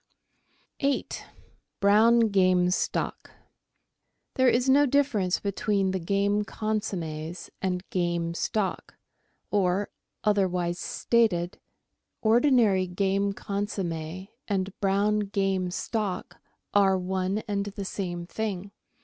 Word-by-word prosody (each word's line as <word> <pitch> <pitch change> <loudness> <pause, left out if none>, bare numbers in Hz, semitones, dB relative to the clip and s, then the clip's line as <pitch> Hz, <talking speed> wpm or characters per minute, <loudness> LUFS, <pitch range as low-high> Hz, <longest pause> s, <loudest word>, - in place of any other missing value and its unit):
8— 280 -1 -1 0.6
BROWN 220 +3 +5
GAME 185 -2 +3
STOCK - - -2 1.0
There 260 -1 +4
is 245 +2 +2
no 285 +2 +5
difference 245 -10 +2
between 200 -1 0
the 190 - -1
game 200 +4 +1
consommes 180 -7 -4
and 185 -1 -2
game 175 -2 0
stock, 195 +3 -2 0.6
or, 195 0 +1 0.3
otherwise 180 -4 +1
stated, 195 -7 +1 0.6
ordinary 225 -5 +4
game 195 +2 0
consomme 190 -4 -4 0.2
and 195 -2 -1
brown 200 +2 +2
game 195 -2 0
stock 205 +1 -3 0.3
are 195 -2 +4
one 190 +2 -1
and 200 -1 -1
the 200 -1 -5
same 175 -3 -4
thing. 200 0 -4
195 Hz, 100 wpm, -27 LUFS, 180-210 Hz, 1.0 s, BROWN